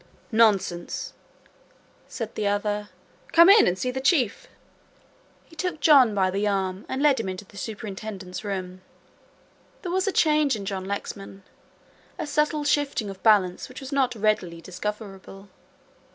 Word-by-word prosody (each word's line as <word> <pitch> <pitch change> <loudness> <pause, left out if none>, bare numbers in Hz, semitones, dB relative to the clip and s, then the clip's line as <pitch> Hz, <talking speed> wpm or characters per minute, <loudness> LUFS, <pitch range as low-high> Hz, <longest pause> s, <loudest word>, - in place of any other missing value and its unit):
"Nonsense," 205 -6 +1 0.9
said - - -6
the 210 - -2
other, 205 0 -1 0.4
"come 340 +2 +8
in 425 - +7
and 180 - +1
see 250 +6 -2
the 265 +1 -4
Chief." 270 - +1 1.0
He 330 - -18
took 355 -1 -3
John 275 -8 +6
by 190 -2 +2
the 200 +2 -1
arm 190 -1 -2
and 265 +2 -2
led 285 -4 +4
him 220 - -3
into 185 +2 -6
the 200 - -20
Superintendent's 200 -1 -7
room. 185 -2 -5 1.0
There 355 - -4
was 375 +2 0
a - - +2
change 300 -6 +3
in 200 -2 -6
John 190 -1 -4
Lexman. 195 0 -6 0.7
A - - -3
subtle 300 +1 0
shifting 285 -8 0
of 190 - -12
balance 200 -4 +3
which 255 - -9
was 270 0 -9
not 265 -3 +1
readily 210 -6 0
discoverable. 195 +1 -7
210 Hz, 150 wpm, -25 LUFS, 195-275 Hz, 1.0 s, come